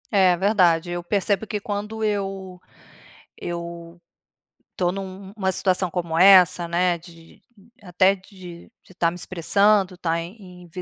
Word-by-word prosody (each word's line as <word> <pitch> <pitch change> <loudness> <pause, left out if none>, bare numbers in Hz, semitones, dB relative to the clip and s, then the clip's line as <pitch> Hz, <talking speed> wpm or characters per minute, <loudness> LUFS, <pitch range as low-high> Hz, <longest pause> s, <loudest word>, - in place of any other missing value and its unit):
É 190 -3 +4
verdade. 180 -3 +2
Eu 175 0 -3
percebo 200 +3 -1
que 210 - -3
quando 210 +2 -5
eu 195 -3 -3 0.8
eu 170 0 -7 0.8
tô 175 -1 0
num 190 0 -8
uma 190 -3 0
situação 185 -1 0
como 170 -2 -3
essa, 180 -1 +6
né, 175 +1 +1
de 165 -1 -17 0.4
até 185 +1 +2
de 185 -2 -13
de 185 - -19
tá 170 -2 +1
me 175 - -9
expressando, 190 +2 +1
tá 165 -2 -1
em 180 -1 -12
185 Hz, 135 wpm, -23 LUFS, 175-195 Hz, 0.8 s, essa